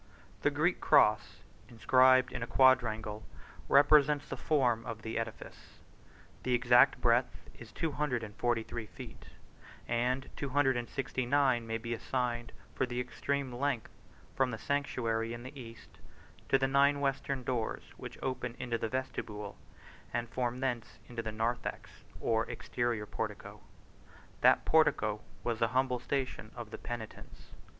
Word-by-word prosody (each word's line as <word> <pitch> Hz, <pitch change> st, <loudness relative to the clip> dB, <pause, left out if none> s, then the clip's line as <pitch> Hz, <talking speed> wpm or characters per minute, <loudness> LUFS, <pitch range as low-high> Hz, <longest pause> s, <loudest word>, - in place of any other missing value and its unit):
A -, -, +5 dB
Greek 155 Hz, +5 st, 0 dB
cross, 110 Hz, -8 st, +3 dB, 0.3 s
inscribed 130 Hz, +2 st, +4 dB
in -, -, -4 dB
a 115 Hz, -, -3 dB
quadrangle, 110 Hz, -5 st, +3 dB, 0.5 s
represents 145 Hz, 0 st, +5 dB
the -, -, -4 dB
form 125 Hz, -7 st, +1 dB
of 110 Hz, -1 st, -7 dB
the 110 Hz, 0 st, -2 dB
edifice; 115 Hz, -, -8 dB, 0.6 s
the 125 Hz, -1 st, +1 dB
exact 125 Hz, +2 st, +5 dB
breadth 120 Hz, +1 st, +1 dB
is 115 Hz, -1 st, -13 dB
two 165 Hz, -2 st, -2 dB
hundred 135 Hz, -5 st, -1 dB
and 105 Hz, -2 st, -8 dB
forty 120 Hz, -2 st, 0 dB
three 110 Hz, -1 st, -6 dB
feet, 90 Hz, -, -11 dB, 0.6 s
and 125 Hz, +3 st, 0 dB
two 140 Hz, -, -4 dB
hundred 135 Hz, -1 st, +3 dB
and 120 Hz, -1 st, -3 dB
sixty 130 Hz, -1 st, -2 dB
nine 130 Hz, -4 st, +2 dB
may 115 Hz, 0 st, -1 dB
be 115 Hz, +1 st, -4 dB
assigned 120 Hz, 0 st, -2 dB, 0.2 s
for 130 Hz, -, 0 dB
the 120 Hz, 0 st, -3 dB
extreme 135 Hz, +1 st, -2 dB
length 130 Hz, -2 st, -2 dB, 0.4 s
from 130 Hz, -1 st, +2 dB
the 115 Hz, -, -4 dB
sanctuary 115 Hz, -4 st, -1 dB
in 120 Hz, -, -9 dB
the 130 Hz, +3 st, -9 dB
east, 115 Hz, -4 st, -12 dB, 0.5 s
to 135 Hz, -, +5 dB
the 135 Hz, 0 st, +1 dB
nine 140 Hz, +1 st, +4 dB
western 135 Hz, -1 st, -1 dB
doors, 120 Hz, -3 st, -2 dB
which -, -, -9 dB
open 125 Hz, -2 st, -3 dB
into 120 Hz, -2 st, -2 dB
the 115 Hz, -, -2 dB
vestibule, 105 Hz, -5 st, -4 dB, 0.6 s
and 120 Hz, 0 st, -2 dB
from 125 Hz, +1 st, -2 dB
thence 125 Hz, -4 st, -3 dB
into 120 Hz, -1 st, -4 dB
the 110 Hz, -1 st, -4 dB
narthex 115 Hz, +3 st, -3 dB, 0.3 s
or 115 Hz, 0 st, 0 dB
exterior 120 Hz, -2 st, -2 dB
portico. -, -, -6 dB, 0.8 s
That -, -, +5 dB
portico 110 Hz, -9 st, +3 dB, 0.2 s
was 115 Hz, -2 st, -1 dB
the 115 Hz, -, +3 dB
humble 130 Hz, -1 st, +1 dB
station 130 Hz, -4 st, -3 dB
of 120 Hz, -3 st, -8 dB
the -, -, -7 dB
penitents. 115 Hz, -2 st, -8 dB
125 Hz, 150 wpm, -32 LUFS, 115-135 Hz, 0.8 s, A